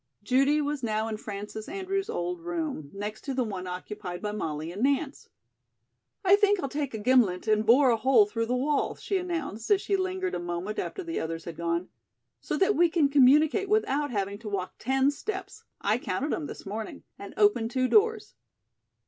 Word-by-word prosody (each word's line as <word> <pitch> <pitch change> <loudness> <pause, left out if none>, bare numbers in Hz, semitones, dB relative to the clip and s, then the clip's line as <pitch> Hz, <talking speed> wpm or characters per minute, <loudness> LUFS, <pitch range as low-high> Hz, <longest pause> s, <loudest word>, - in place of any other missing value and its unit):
Judy 275 +6 +3
was 290 -1 -2
now 220 -2 -1
in 220 -1 -3
Frances 210 +2 -7
Andrews' 390 +3 -3
old 360 -6 -3
room, 325 - -4
next 205 +2 -6
to 275 -3 -3
the 255 - +1
one 190 -5 -5
occupied 180 0 -6
by 210 - -3
Molly 160 -6 -4
and 195 +5 -6
Nance. 280 +2 0 1.0
"I 385 +2 +7
think 410 -1 +3
I'll 275 - -2
take 285 -3 -3
a - - -2
gimlet 220 -5 +2
and 215 0 +3
bore 255 +2 +6
a 230 - +2
hole 225 -2 +5
through 230 +2 -2
the 250 - 0
wall," 280 +3 0
she 390 - -2
announced 330 - -4
as 405 - +5
she 400 - 0
lingered 375 -1 -2
a - - -2
moment 175 +4 -4
after 380 - -4
the 330 -1 -3
others 165 0 -4
had 170 - -6
gone, 170 +1 -2 0.5
"so - - -3
that 390 +2 +3
we 345 0 +4
can 315 -4 +2
communicate 300 +8 +4
without 295 -9 +1
having 200 -3 -2
to 225 -2 -7
walk 190 -2 -3
ten 265 +2 +2
steps 380 +6 -6 0.2
I 215 +4 +1
counted 250 +8 -2
them 305 - -2
this - - -9
morning 215 +2 -6 0.2
and - - -9
open 410 - +3
two 255 +1 +1
doors." 435 - +2
255 Hz, 195 wpm, -28 LUFS, 210-335 Hz, 1.0 s, I